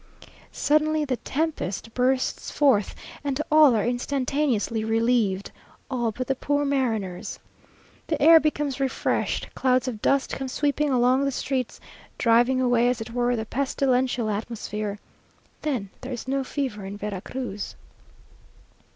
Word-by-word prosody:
Suddenly 305 +1 +2
the 260 -3 -1
tempest 270 - -3
bursts 255 +1 0
forth; 260 -9 +2 0.3
and 280 -1 -2
all 305 -5 +7
are 215 - +1
instantaneously 250 -2 0
relieved 225 -3 +1 0.4
all 240 -3 0
but 255 +4 -4
the 270 - +1
poor 285 +2 0
mariners! 225 -10 -1 0.7
The 310 - -1
air 325 +2 +8
becomes 295 -3 -1
refreshed 270 -1 -1
clouds 255 -1 +2
of 225 -4 -4
dust 275 -1 +2
come 270 - -3
sweeping 290 +2 0
along 255 +1 +3
the 275 - +1
streets, 255 -1 -2 0.4
driving 240 +2 +4
away, 245 -1 +3
as 250 -2 -1
it 225 +1 -6
were, 245 0 +1
the 220 -1 -3
pestilential 255 -2 0
atmosphere. 210 -1 -4 0.6
Then 245 -11 -2
there 260 - -6
is 245 0 -5
no 270 +1 0
fever 260 -6 -3
in 195 +1 -6
Vera 205 -2 -4
Cruz. 235 -6 -5
255 Hz, 135 wpm, -25 LUFS, 225-275 Hz, 0.7 s, air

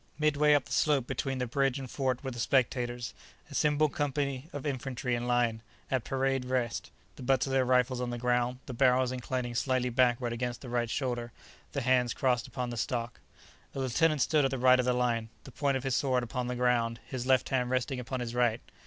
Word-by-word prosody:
Midway 150 -1 +4
up 145 - +1
the - - -14
slope 145 -5 +2
between 135 +1 -2
the 125 - -1
bridge 135 +2 +1
and 135 -1 -6
fort 130 +1 -2
were 135 - -3
the 120 - -7
spectators—a 120 -2 -2
single 150 +1 +3
company 140 0 -2
of 145 -4 -6
infantry 130 -2 -2
in 120 0 -1
line, 120 -2 +1 0.3
at 130 -3 +1
"parade 135 -1 0
rest," 125 -3 -1 0.3
the - - -10
butts 130 0 +2
of 135 - -4
their 135 -1 +3
rifles 125 0 +2
on 125 - -2
the 120 - -3
ground, 125 +1 +1
the 130 - -6
barrels 125 0 +3
inclining 125 -1 -3
slightly 130 0 0
backward 120 -1 +2
against 120 0 -3
the 130 - -8
right 120 -1 0
shoulder, 120 -2 -2 0.4
the 140 - -1
hands 125 -1 +2
crossed 125 0 +1
upon 125 -1 -4
the 120 - -5
stock. 120 0 -2 0.6
A - - -3
lieutenant 145 +3 +2
stood 155 -2 +2
at 135 - +2
the 135 - -2
right 130 0 +5
of 125 - +1
the 125 - +3
line, 120 -2 0
the 135 - -11
point 140 +1 0
of 130 - -6
his 135 -2 0
sword 130 -3 +1
upon 125 +1 -3
the 125 - -2
ground, 120 -2 +1
his 130 -1 -5
left 130 -1 +3
hand 125 -2 0
resting 130 +1 -1
upon 125 +1 -4
his 120 -1 -4
right. 120 -2 +2
125 Hz, 215 wpm, -30 LUFS, 120-135 Hz, 0.6 s, right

